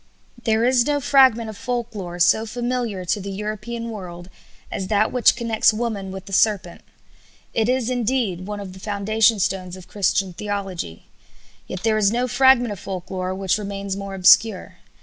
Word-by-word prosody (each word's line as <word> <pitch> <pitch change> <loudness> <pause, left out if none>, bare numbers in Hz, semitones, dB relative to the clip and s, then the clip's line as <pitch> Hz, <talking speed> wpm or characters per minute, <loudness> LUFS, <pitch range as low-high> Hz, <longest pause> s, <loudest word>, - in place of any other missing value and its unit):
There 225 +1 +2
is 250 0 +3
no 290 -1 +1
fragment 260 -5 +4
of 215 - -7
folk 240 +1 -4
lore 180 -4 -6
so 220 +6 +3
familiar 240 -4 -3
to 205 +4 -1
the 200 - -6
European 215 +3 -5
world 180 -3 -9 0.4
as 190 - -4
that 215 +1 +2
which 250 -2 +4
connects 230 -2 +2
woman 215 -4 -3
with 190 0 -8
the 195 - -10
serpent. 190 -4 +1 0.7
It 225 +1 +1
is, 255 -2 +1
indeed, 235 -7 -1
one 210 0 -5
of 195 -2 -8
the 190 - -12
foundation 215 +3 +2
stones 185 -1 -2
of 185 - -13
Christian 195 -2 0
theology. 195 - -5 0.6
Yet 185 - -6
there 220 -1 +2
is 200 -2 +4
no 245 +2 0
fragment 255 -1 +4
of 200 - -6
folk 185 -2 -7
lore 185 0 -3
which 195 +1 0
remains 200 -1 -4
more 200 0 -6
obscure. 190 -1 +4
210 Hz, 175 wpm, -22 LUFS, 190-230 Hz, 0.7 s, fragment